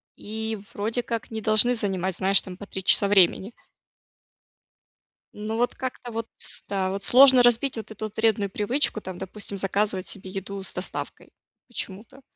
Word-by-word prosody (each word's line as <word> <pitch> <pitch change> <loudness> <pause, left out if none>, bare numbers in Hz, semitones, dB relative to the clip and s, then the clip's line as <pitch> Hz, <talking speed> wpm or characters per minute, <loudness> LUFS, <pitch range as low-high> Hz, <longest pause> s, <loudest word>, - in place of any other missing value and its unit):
и 220 +1 -4 0.2
вроде 225 +4 -2
как 230 0 -4
не 220 - -4
должны 220 +3 +4
занимать, 190 -4 -1
знаешь, 195 +1 +5
там, 185 - -9
по 200 +2 -10
3 190 - -5
часа 200 +1 +4
времени. 195 +2 +4 1.8
Ну, 215 +1 -4
вот 245 +1 0
как-то 250 -2 -6
вот, 230 0 -4
ста 195 -1 -3
сложно 260 +4 +7
разбить 240 +1 +3
вот 225 - -6
эту 215 0 -6
вот 215 - -9
вредную 220 -2 +2
привычку, 215 +5 0
там, 185 -3 -8
допустим, 200 +1 -6
заказывать 195 -1 0
себе 190 -1 -8
еду 195 +1 -6
с 190 - -6
доставкой 180 - -6 0.4
почему-то. 230 +2 -7
210 Hz, 155 wpm, -25 LUFS, 195-230 Hz, 1.8 s, сложно